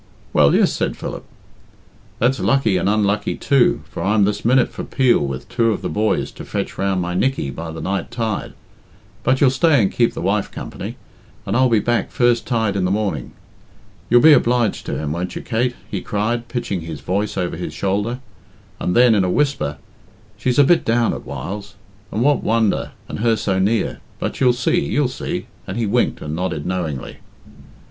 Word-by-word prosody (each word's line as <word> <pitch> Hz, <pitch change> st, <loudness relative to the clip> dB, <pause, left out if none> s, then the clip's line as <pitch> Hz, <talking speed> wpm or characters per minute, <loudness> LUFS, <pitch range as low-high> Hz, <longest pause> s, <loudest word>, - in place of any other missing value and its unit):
"Well, 70 Hz, -1 st, +5 dB
yes," -, -, +3 dB
said -, -, -2 dB
Philip. -, -, -6 dB, 0.9 s
"That's 125 Hz, +3 st, +2 dB
lucky 125 Hz, -8 st, +2 dB
and 95 Hz, -, +1 dB
unlucky 105 Hz, -1 st, +1 dB
too, 135 Hz, -3 st, +2 dB
for -, -, -7 dB
I'm 105 Hz, +1 st, +3 dB
this 105 Hz, 0 st, -2 dB
minute 125 Hz, +2 st, +4 dB
for -, -, -7 dB
Peel 130 Hz, -3 st, +3 dB
with 70 Hz, -2 st, -4 dB
two 115 Hz, -2 st, +1 dB
of 105 Hz, -, -3 dB
the -, -, -2 dB
boys 110 Hz, +1 st, 0 dB
to -, -, -10 dB
fetch -, -, -4 dB
round 95 Hz, -1 st, +1 dB
my 90 Hz, 0 st, -3 dB
Nickey 125 Hz, -, 0 dB
by 80 Hz, +3 st, -6 dB
the 80 Hz, 0 st, -6 dB
night 95 Hz, -2 st, -2 dB
tide. 115 Hz, -3 st, -3 dB, 0.7 s
But 130 Hz, +1 st, +1 dB
youll 135 Hz, -3 st, +6 dB
stay 150 Hz, +1 st, +3 dB
and 100 Hz, -4 st, +2 dB
keep 120 Hz, -1 st, +1 dB
the -, -, -4 dB
wife 100 Hz, +3 st, 0 dB
company, -, -, -7 dB, 0.5 s
and 100 Hz, -, -1 dB
I'll 130 Hz, +1 st, +4 dB
be 115 Hz, -, +4 dB
back 120 Hz, +3 st, 0 dB
first 120 Hz, -1 st, +2 dB
tide 110 Hz, -5 st, 0 dB
in 95 Hz, -, 0 dB
the 90 Hz, -, +1 dB
morning. 95 Hz, -, -2 dB, 0.8 s
You'll 120 Hz, +1 st, +6 dB
be 160 Hz, -, +9 dB
obliged 120 Hz, -5 st, +2 dB
to -, -, -2 dB
him, 75 Hz, -1 st, -3 dB
won't 90 Hz, +3 st, -3 dB
you, -, -, -5 dB
Kate?" 120 Hz, +1 st, 0 dB, 0.2 s
he -, -, -2 dB
cried, 115 Hz, +3 st, -2 dB
pitching 120 Hz, -7 st, -3 dB
his 80 Hz, -3 st, -7 dB
voice 100 Hz, +7 st, -2 dB
over 90 Hz, -2 st, -1 dB
his 85 Hz, -, -5 dB
shoulder; 105 Hz, +6 st, -2 dB, 0.6 s
and 90 Hz, -, -1 dB
then, 120 Hz, -1 st, +6 dB
in 100 Hz, -3 st, +3 dB
a 90 Hz, -, 0 dB
whisper, 140 Hz, -, 0 dB, 0.6 s
"She's 120 Hz, +4 st, -1 dB
a 145 Hz, -, +7 dB
bit 170 Hz, +5 st, +4 dB
down 115 Hz, 0 st, +2 dB
at -, -, -8 dB
whiles, 90 Hz, +10 st, -6 dB, 0.4 s
and 110 Hz, -, 0 dB
what 145 Hz, +1 st, +3 dB
wonder, 110 Hz, -2 st, +1 dB
and -, -, -6 dB
her 115 Hz, 0 st, +3 dB
so 95 Hz, -3 st, -1 dB
near 105 Hz, +4 st, 0 dB, 0.2 s
but -, -, -4 dB
you'll 125 Hz, -2 st, +5 dB
see, 125 Hz, 0 st, +1 dB
you'll 145 Hz, -2 st, +1 dB
see," 130 Hz, -, -4 dB, 0.2 s
and -, -, -4 dB
he 115 Hz, -, 0 dB
winked 120 Hz, +4 st, 0 dB
and 75 Hz, +1 st, -4 dB
nodded 85 Hz, -4 st, -3 dB
knowingly. 85 Hz, -7 st, -3 dB
110 Hz, 195 wpm, -20 LUFS, 95-120 Hz, 0.9 s, be